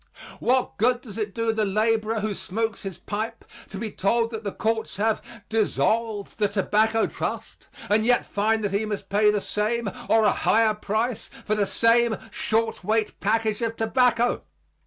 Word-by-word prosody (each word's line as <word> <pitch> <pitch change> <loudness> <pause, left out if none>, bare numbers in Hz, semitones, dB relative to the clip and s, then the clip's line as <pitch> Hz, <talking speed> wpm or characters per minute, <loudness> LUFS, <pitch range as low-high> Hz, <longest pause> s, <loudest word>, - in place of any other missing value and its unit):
What 255 +1 +1
good 245 +3 +3
does 225 -4 -8
it 205 -2 -3
do 230 -1 0
the 220 -1 0
laborer 215 +2 +1
who 215 0 -1
smokes 220 +4 -3
his 195 -3 -6
pipe 220 +2 -5 0.2
to 195 - -7
be 215 +1 -4
told 230 +4 +1
that 220 -1 -5
the 200 - -3
courts 220 0 -2
have 220 +1 +1 0.3
"dissolved" 220 -1 0
the 210 - +3
Tobacco 215 +3 +2
Trust - - -5 0.2
and 215 +1 +3
yet 245 +2 +3
find 220 +2 0
that 205 - 0
he 200 +2 0
must 210 -2 -4
pay 210 +1 +4
the 210 0 +2
same 215 +3 -1 0.2
or 225 0 +5
a 205 - +5
higher 220 -1 +3
price 215 +3 -2 0.2
for 215 - +1
the 205 -2 +1
same 230 +1 +3
short 225 -2 -1
weight 215 +2 0
package 220 +1 0
of 230 -1 -2
tobacco? 240 +1 +2
220 Hz, 175 wpm, -25 LUFS, 210-230 Hz, 0.3 s, or